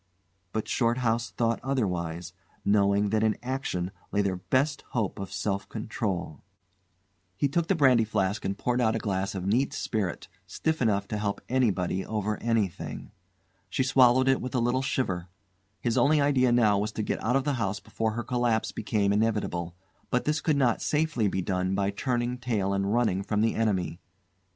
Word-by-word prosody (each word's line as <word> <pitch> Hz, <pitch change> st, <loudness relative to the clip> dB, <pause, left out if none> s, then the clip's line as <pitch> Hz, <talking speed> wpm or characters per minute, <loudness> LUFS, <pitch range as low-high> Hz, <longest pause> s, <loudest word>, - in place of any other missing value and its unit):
But 110 Hz, -, -2 dB
Shorthouse 115 Hz, -1 st, +1 dB
thought 115 Hz, -1 st, 0 dB
otherwise, 90 Hz, -10 st, -2 dB, 0.3 s
knowing 100 Hz, 0 st, +3 dB
that 110 Hz, -1 st, +2 dB
in 110 Hz, -1 st, +2 dB
action 125 Hz, -9 st, -2 dB, 0.2 s
lay 100 Hz, 0 st, +2 dB
their 95 Hz, -2 st, -1 dB
best 140 Hz, +10 st, 0 dB
hope 110 Hz, -4 st, -1 dB
of 95 Hz, -1 st, -6 dB
self 100 Hz, -1 st, -2 dB
control. 100 Hz, -8 st, -3 dB, 1.0 s
He 140 Hz, -, +2 dB
took 165 Hz, +4 st, 0 dB
the 195 Hz, -, +2 dB
brandy 130 Hz, -7 st, +5 dB
flask 100 Hz, -2 st, -1 dB
and 95 Hz, +1 st, -2 dB
poured 125 Hz, 0 st, 0 dB
out 110 Hz, -1 st, +2 dB
a -, -, +1 dB
glass 100 Hz, -3 st, -2 dB
of 95 Hz, -1 st, -4 dB
neat 120 Hz, +8 st, +1 dB
spirit, 100 Hz, -6 st, -2 dB, 0.2 s
stiff 160 Hz, -, -2 dB
enough 100 Hz, -4 st, +1 dB
to 105 Hz, -, -2 dB
help 100 Hz, -1 st, -1 dB
anybody 95 Hz, -7 st, +1 dB
over 105 Hz, -1 st, -2 dB
anything. 110 Hz, -6 st, -2 dB, 0.6 s
She -, -, 0 dB
swallowed 130 Hz, 0 st, +5 dB
it 135 Hz, 0 st, +3 dB
with 130 Hz, 0 st, -5 dB
a -, -, +3 dB
little 120 Hz, +2 st, +1 dB
shiver. 95 Hz, -10 st, -2 dB, 0.5 s
His 120 Hz, +1 st, +1 dB
only 150 Hz, +5 st, +4 dB
idea 135 Hz, -3 st, +3 dB
now 110 Hz, -4 st, +4 dB
was 105 Hz, +2 st, -1 dB
to 110 Hz, -, -2 dB
get -, -, -2 dB
out 120 Hz, +4 st, +1 dB
of 135 Hz, -, +2 dB
the 145 Hz, 0 st, 0 dB
house 100 Hz, 0 st, -1 dB
before 110 Hz, -1 st, -2 dB
her 120 Hz, +2 st, -3 dB
collapse 120 Hz, -2 st, 0 dB
became 105 Hz, -2 st, 0 dB
inevitable; 105 Hz, -6 st, 0 dB, 0.3 s
but 125 Hz, -, 0 dB
this 150 Hz, +1 st, +1 dB
could 155 Hz, -3 st, +1 dB
not 125 Hz, -4 st, +2 dB
safely 150 Hz, -8 st, +1 dB
be 95 Hz, -1 st, -1 dB
done 95 Hz, 0 st, 0 dB
by 100 Hz, 0 st, +1 dB
turning 120 Hz, +3 st, -1 dB
tail 105 Hz, -6 st, 0 dB
and 100 Hz, 0 st, 0 dB
running 110 Hz, -5 st, +2 dB
from 105 Hz, +1 st, -1 dB
the 110 Hz, 0 st, +2 dB
enemy. 95 Hz, -6 st, 0 dB
110 Hz, 180 wpm, -28 LUFS, 100-125 Hz, 1.0 s, brandy